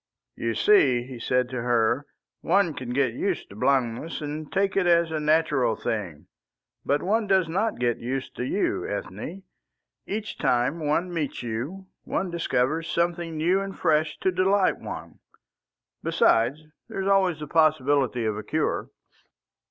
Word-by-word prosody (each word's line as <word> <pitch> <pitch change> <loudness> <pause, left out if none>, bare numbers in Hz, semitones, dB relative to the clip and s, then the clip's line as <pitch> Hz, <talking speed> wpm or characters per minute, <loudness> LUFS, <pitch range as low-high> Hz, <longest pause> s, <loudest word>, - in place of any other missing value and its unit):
"You - - -2
see," 255 - +4
he 125 -1 -9
said 125 +1 +1
to 125 -2 -3
her, 120 +3 +1 0.3
"one 185 -2 +2
can 130 -3 -7
get 130 -1 +1
used 185 +7 -2
to - - -11
blindness 130 +4 0
and 150 0 -5
take 195 0 +1
it 190 -2 +2
as 170 -1 +4
the 155 - -1
natural 150 -6 +2
thing. 95 -12 -4 0.6
But 145 +1 +1
one 215 +3 +1
does 190 -3 +3
not 200 +7 -1
get 120 -1 0
used 130 +2 -4
to - - -2
you, 190 +11 0
Ethne. 105 - -5 0.6
Each 215 +2 -4
time 125 +7 +1
one 165 +4 0
meets 150 -6 -3
you, 130 +12 -4 0.2
one 185 - -2
discovers 160 -1 0
something 170 -1 -1
new 180 +5 +2
and 195 -1 -6
fresh 155 -2 +1
to 190 - +2
delight 190 +2 +2
one. - - -8 0.8
Besides, 125 +7 +2 0.3
there 195 - -4
is 190 - -2
always 190 -5 +3
the 150 - -5
possibility 145 -6 +2
of 105 -1 -1
a - - -6
cure." 155 +8 -1
155 Hz, 155 wpm, -26 LUFS, 125-180 Hz, 0.8 s, see